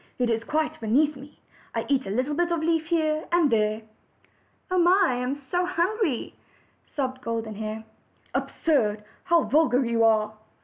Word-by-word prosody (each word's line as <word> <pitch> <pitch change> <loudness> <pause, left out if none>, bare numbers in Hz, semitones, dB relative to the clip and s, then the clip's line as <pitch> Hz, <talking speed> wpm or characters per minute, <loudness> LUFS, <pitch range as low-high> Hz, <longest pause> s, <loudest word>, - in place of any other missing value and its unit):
It 245 -2 +1
is 225 0 -1
quite 310 +5 -1
beneath 285 +7 +2
me. 275 +2 -13 0.4
I - - -1
eat 270 -6 +1
a - - -4
little 255 +8 -1
bit 345 +3 0
of 335 -2 0
leaf 325 -1 +1
here 315 -2 0
and 340 -4 +3
there." 215 0 +1 0.9
"Oh! 365 +1 +4
I 290 - +1
am 250 +2 -2
so 290 +6 -2
hungry!" 365 - -1 0.6
sobbed 260 -2 -2
Golden 230 -2 -3
Hair. 215 +1 -5 0.5
"Absurd! 215 -10 0 0.2
How 340 -2 +4
vulgar 260 0 +3
you 230 -1 +1
are!" 215 -1 +3
275 Hz, 160 wpm, -25 LUFS, 225-325 Hz, 0.9 s, Oh